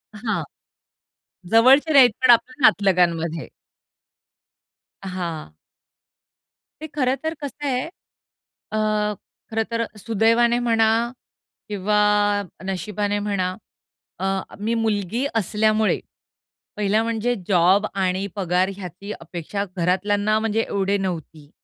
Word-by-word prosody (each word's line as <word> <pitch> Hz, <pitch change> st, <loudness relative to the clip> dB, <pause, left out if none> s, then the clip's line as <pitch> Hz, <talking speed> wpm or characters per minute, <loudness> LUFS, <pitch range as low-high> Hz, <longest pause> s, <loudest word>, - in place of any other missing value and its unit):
हां. 220 Hz, +1 st, -2 dB, 1.1 s
जवळचे 265 Hz, +7 st, +5 dB
नाही, 270 Hz, -3 st, +9 dB
पण 255 Hz, -, +3 dB
आपल्या 255 Hz, +4 st, +2 dB
नातलगांमध्ये. 170 Hz, -4 st, +1 dB, 1.5 s
हां. 175 Hz, -, -5 dB, 1.3 s
ते 315 Hz, -, -5 dB
खरंतर 280 Hz, +3 st, 0 dB
कसं 290 Hz, +1 st, -6 dB
आहे, 255 Hz, -2 st, 0 dB, 0.9 s
अ, 215 Hz, -, -1 dB, 0.7 s
खरंतर 230 Hz, +1 st, -1 dB
सुदैवाने 230 Hz, +3 st, +2 dB
म्हणा 225 Hz, -2 st, +3 dB, 0.8 s
किंवा 210 Hz, +1 st, 0 dB, 0.7 s
नशिबाने 205 Hz, +2 st, -2 dB
म्हणा 190 Hz, -3 st, -1 dB, 0.6 s
अ, 190 Hz, -, -2 dB, 0.3 s
मी 220 Hz, +3 st, -1 dB
मुलगी 220 Hz, +2 st, -1 dB
असल्यामुळे 215 Hz, +1 st, +1 dB, 0.8 s
पहिला 210 Hz, +1 st, +2 dB
म्हणजे 230 Hz, +1 st, -1 dB
जॉब 190 Hz, +2 st, +4 dB
आणि 190 Hz, 0 st, 0 dB
पगार 185 Hz, -1 st, +1 dB
ह्याची 195 Hz, +2 st, -8 dB
अपेक्षा 170 Hz, +4 st, -5 dB
घरातल्यांना 205 Hz, +4 st, +1 dB
म्हणजे 225 Hz, 0 st, 0 dB
एवढी 200 Hz, 0 st, 0 dB
नव्हती. 165 Hz, -6 st, -5 dB
205 Hz, 90 wpm, -22 LUFS, 185-230 Hz, 1.5 s, नाही